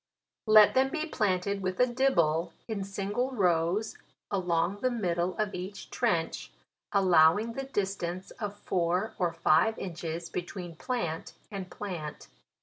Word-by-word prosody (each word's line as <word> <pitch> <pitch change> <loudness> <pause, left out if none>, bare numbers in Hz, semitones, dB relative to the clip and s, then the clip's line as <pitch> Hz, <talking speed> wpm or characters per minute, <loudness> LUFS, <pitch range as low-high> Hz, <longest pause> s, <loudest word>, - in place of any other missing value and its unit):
" - - -62
Let 215 -1 +8
them 265 +1 +3
be 310 +2 -2
planted 200 - 0
with 185 -1 -2
a 250 - +6
dibble, 175 - +2
in 215 -4 -3
single 200 +6 -2
rows 180 +1 +1 0.3
along 180 -1 +1
the 255 - +1
middle 180 -6 -1
of 215 -2 -1
each 190 +3 -7
trench, 170 -9 -1 0.4
allowing 190 +2 +4
the 270 +2 -4
distance 190 -6 -3
of 205 -1 -4
four 180 +1 0
or 175 -2 +2
five 165 +6 +3
inches 170 -2 -5
between 175 -1 -6
plant 175 -6 -3 0.2
and 195 -3 -5
plant. 170 -7 -6
190 Hz, 140 wpm, -29 LUFS, 170-215 Hz, 0.4 s, Let